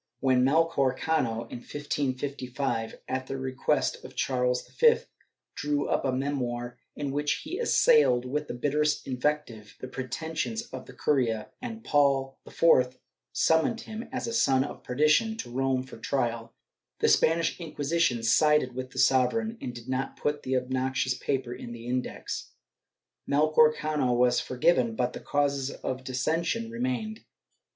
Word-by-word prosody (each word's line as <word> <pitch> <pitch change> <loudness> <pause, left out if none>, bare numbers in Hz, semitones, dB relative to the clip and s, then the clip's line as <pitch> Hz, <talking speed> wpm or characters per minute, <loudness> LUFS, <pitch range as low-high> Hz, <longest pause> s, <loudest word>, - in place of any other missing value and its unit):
When 130 -1 +3
Melchor 140 -2 +2
Cano, 130 -8 0
in - - -6
1555, 135 -3 -3
at 130 0 -3
the 135 - -4
request 130 -1 -1
of - - -11
Charles 125 -1 0
V, 470 0 +4 0.6
drew 145 0 -1
up - - 0
a 135 - +2
memoir 125 -3 -3 0.2
in 140 -2 -3
which 145 +1 0
he 345 +7 -5
assailed, 460 - +4
with 150 +3 -2
the - - -5
bitterest 150 +4 0
invective, 125 -5 -2
the 130 - -6
pretensions 160 - -3
of 240 - -9
the - - -12
curia, 120 -7 0
and 230 -3 -6
Paul 135 -4 +2
IV 130 -6 +3 0.3
summoned 160 +8 +2
him, 220 +1 -7
as 255 - -3
a 230 - -3
son 135 - +3
of - - -7
perdition, 155 - +2
to 120 - -6
Rome 130 0 0
for 130 - -11
trial, 115 -3 -2 0.4
the - - +2
Spanish 165 +2 +3
Inquisition 155 -5 0
sided 150 +1 +4
with 130 +1 -5
the - - -14
sovereign 220 - +3
and 125 - -4
did 120 0 -11
not 130 +1 -2
put 145 0 -1
the 130 0 0
obnoxious 130 0 0
paper 130 -1 -2
in 120 - -8
the 115 0 -9
Index.* 125 +1 -4 0.8
Melchor 155 +1 +5
Cano 150 -5 0
was 125 0 +3
forgiven, 125 -3 +2
but 125 +1 0
the - - -6
causes 140 -2 0
of 130 -1 -5
dissension 165 - -1
remained. 230 -2 -3
135 Hz, 150 wpm, -28 LUFS, 125-155 Hz, 0.8 s, Melchor